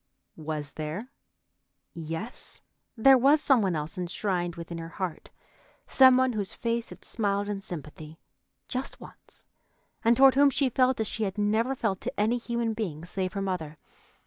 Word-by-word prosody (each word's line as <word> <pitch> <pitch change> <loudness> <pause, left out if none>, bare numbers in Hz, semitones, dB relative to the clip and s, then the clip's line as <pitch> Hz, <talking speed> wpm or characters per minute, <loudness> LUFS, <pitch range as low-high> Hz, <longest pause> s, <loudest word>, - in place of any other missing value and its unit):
Was 150 -2 -5
there? 165 - -5 0.8
Yes, 165 +8 -5 0.3
there 265 +3 +7
was 280 +5 +5
some 270 -5 +4
one 190 -4 0
else 155 +5 -4
enshrined 175 -1 -2
within 170 0 -7
her 165 0 -7
heart, 175 -2 -5 0.6
some 260 -1 +6
one 260 -1 +2
whose 205 -3 -3
face 235 0 -2
had - - -13
smiled 205 -2 -1
in 205 -1 -3
sympathy 155 -3 -8 0.5
just 260 +1 -5
once, - - -13 0.6
and 230 +1 +4
toward 270 -1 +7
whom 280 +1 +5
she 275 -1 +1
felt 255 +1 +2
as 220 - +1
she 220 - -5
had 195 +1 -4
never 220 +5 +1
felt 205 -7 -2
to - - -5
any 220 +4 +2
human 235 -1 -2
being 175 -8 -4
save 185 +1 -3
her 195 -1 -2
mother. 160 -6 -4
205 Hz, 165 wpm, -27 LUFS, 170-240 Hz, 0.8 s, there